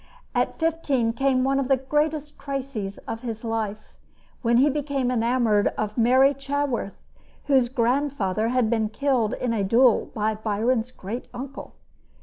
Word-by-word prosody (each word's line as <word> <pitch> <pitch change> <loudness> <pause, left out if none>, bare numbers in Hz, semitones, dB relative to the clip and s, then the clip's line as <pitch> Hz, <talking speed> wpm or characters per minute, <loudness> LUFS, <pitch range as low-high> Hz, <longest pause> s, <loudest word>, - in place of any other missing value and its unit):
At - - 0
fifteen 290 -8 0
came 260 +1 +1
one 270 +1 +2
of 270 - -1
the 270 0 +3
greatest 295 +2 -1
crises 260 -8 -4
of 225 - -4
his 230 -2 -5
life, 220 -2 -3 0.5
when 235 -1 +3
he 270 +4 +5
became 280 -3 -1
enamored 230 -3 +2
of 210 0 -2
Mary 260 +4 +5
Chaworth, 275 -6 -3 0.5
whose 265 -4 +3
grand 260 +3 +1
father 215 -3 -1
had 250 -1 +2
been 220 -1 0
killed 250 -1 0
in 245 -2 -2
a 210 -3 0
duel 230 +4 +4
by 215 0 0
Byron's 220 +3 0
great 235 0 -7
uncle. 270 +2 -8
250 Hz, 150 wpm, -24 LUFS, 225-275 Hz, 0.5 s, he